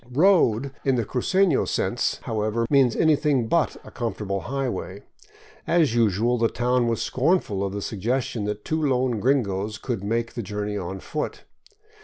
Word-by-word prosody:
" 120 - -23
Road 140 - +3
" - - -32
in 135 -1 +2
the 120 -3 0
cru 125 - -2
cefio 190 -3 +2
sense, - - 0
however, 110 +1 -1
means 135 -5 +4
anything 150 -6 +2
but 170 +5 +1
a - - -12
comfortable 105 -4 -3
highway. 120 -6 -4 0.6
As 165 -8 +3
usual, 115 +1 +2
the 115 - +3
town 125 +1 +1
was 115 -1 0
scornful 130 - +1
of 100 - -2
the 100 0 -4
suggestion 115 +1 -2
that 105 0 -4
two 160 0 -1
lone 130 -4 +1
gringos 105 -5 0
could 115 -4 -4
make 115 +3 -1
the 120 - -4
journey 105 0 -4
on 95 -1 -5
foot. 150 - -4
120 Hz, 170 wpm, -24 LUFS, 105-135 Hz, 0.6 s, means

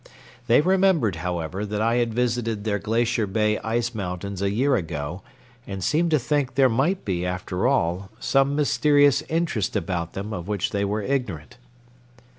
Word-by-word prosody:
They 120 +3 +5
remembered, 180 - +2
however, 90 +2 -3
that 105 0 -3
I 115 +2 +2
had 120 -1 +1
visited 115 -2 -1
their 105 -2 -1
Glacier 115 0 0
Bay 105 +2 +1
ice 115 +1 -1
mountains 95 -1 -5
a 100 - +1
year 130 +7 +2
ago, 80 -2 -4 0.5
and 95 -2 -5
seemed 160 - +2
to 155 - +4
think 135 -1 -1
there 135 -1 +5
might 145 +11 0
be, 90 -3 -1
after 90 +3 -2
all, 95 -7 0
some 135 +1 +2
mysterious 145 -1 +3
interest 160 - -1
about 85 -3 -2
them 100 +3 -5
of 90 -3 -5
which 105 -3 -1
they 100 0 -1
were 105 +1 -1
ignorant. 120 - -3
110 Hz, 165 wpm, -24 LUFS, 95-135 Hz, 0.5 s, They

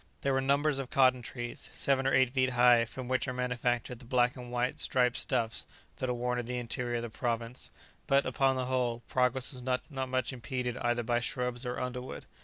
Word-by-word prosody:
There 140 - +1
were 135 - +2
numbers 140 +1 +2
of 135 -2 -4
cotton 130 -3 +4
trees, 120 0 -6
seven 135 -1 +2
or 135 - +2
eight 130 -2 +4
feet 130 -1 +2
high, 120 -1 +6
from 125 +2 -7
which 130 +2 0
are 125 - -2
manufactured 125 -1 -1
the 125 - -12
black 125 0 +2
and 125 -2 -8
white 125 +1 -1
striped 125 -2 +2
stuffs 115 -3 -1 0.3
that 130 - -2
are - - +1
worn 125 +1 -1
in 120 - -4
the 125 0 -2
interior 120 0 -2
of 120 - -1
the 120 - -5
province; 120 0 -3 0.4
but, 140 0 +4
upon 135 -1 +2
the 130 -1 -1
whole, 125 -2 -1
progress 125 +2 +1
was 125 - -6
not 125 0 -1
much 130 -1 -1
impeded 125 0 -3
either 120 0 0
by 120 +1 +1
shrubs 125 -1 -2
or 125 - -3
underwood. 125 0 -5
125 Hz, 210 wpm, -31 LUFS, 120-130 Hz, 0.4 s, high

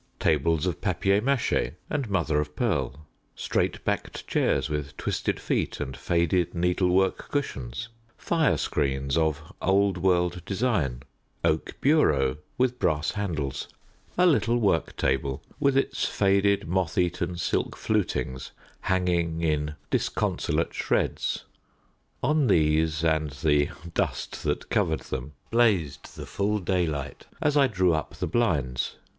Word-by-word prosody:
Tables 80 +1 +2
of 90 -4 -2
papier 100 +1 +2
maché 135 0 +1
and 140 -6 -2
mother 85 -6 +1
of 75 0 -6
pearl, 75 - -1 0.3
straight - - -1
backed - - -2
chairs 65 - +1
with 75 -2 -4
twisted - - -1
feet - - -1
and 65 - -4
faded 85 +1 +1
needlework 90 +2 +1
cushions, 70 - -3 0.3
firescreens 70 - 0
of 80 -2 0
old 95 0 +2
world 90 -1 +1
design, 95 - -1 0.4
oak 80 0 0
bureaux 75 - +3 0.2
with 125 -1 +1
brass 75 -2 +1
handles, 75 -10 -3 0.5
a 180 - +5
little 120 -8 +3
work 100 -8 +1
table 65 0 0 0.2
with 140 -1 +3
its 135 - 0
faded 100 -1 +2
moth 90 -1 -1
eaten 90 0 0
silk 85 - -1
flutings 65 - -1 0.3
hanging 85 -3 0
in 75 -1 0 0.2
disconsolate - - 0
shreds: - - -1 0.8
on 150 +1 +3
these 80 -1 +2
and 80 -2 +2
the 75 -2 +3 0.2
dust - - -2
that - - -2
covered 80 -1 +1
them 65 +3 -5 0.2
blazed 95 - +1
the - - -7
full 105 +1 0
daylight 85 -7 -2
as 150 -1 +1
I 140 -2 +5
drew 95 -6 +2
up 80 - -3
the - - -2
blinds. 75 - 0
85 Hz, 125 wpm, -26 LUFS, 75-100 Hz, 0.8 s, a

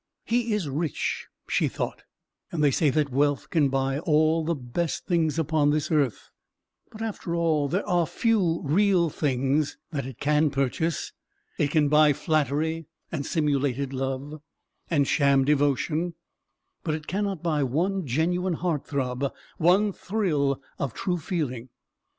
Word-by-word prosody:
"He 235 -1 +1
is 195 -7 -2
rich," 150 +3 -2 0.2
she - - +2
thought, - - -4 0.5
"and 155 -3 -1
they 145 - +5
say 150 +3 +2
that 140 0 +1
wealth 145 +1 +1
can 150 -5 +3
buy 135 +1 0
all 155 +1 +2
the 165 +1 0
best 145 +5 -3
things 165 -4 +1
upon 155 -2 +2
this 150 +1 0
earth. 145 -7 0 0.6
But, 220 +1 -7
after 200 -6 -3
all, 160 -4 +2
there 185 +9 -1
are 175 -4 +2
few 190 -7 +1
real 175 +1 +3
things 140 +1 0
that 140 -5 -3
it 130 -3 -9
can 150 +1 +3
purchase. 140 +4 -1 0.5
It 145 - +2
can 150 0 +3
buy 150 0 +5
flattery, 155 +1 0 0.2
and 140 -4 -3
simulated 140 -4 0
love, 135 +3 -4 0.5
and 145 -5 +2
sham 140 -2 +3
devotion, 150 +4 +1 0.7
but 155 -2 0
it 155 -1 -7
cannot 195 -2 -2
buy 155 -3 +1
one 175 +9 0
genuine 175 +7 +1
heart 165 -3 -2
throb, 130 -1 -1 0.3
one 190 +5 +4
thrill 155 -11 0 0.2
of 135 -5 -3
true 180 -2 -1
feeling. 145 - -3
155 Hz, 145 wpm, -26 LUFS, 140-170 Hz, 0.7 s, they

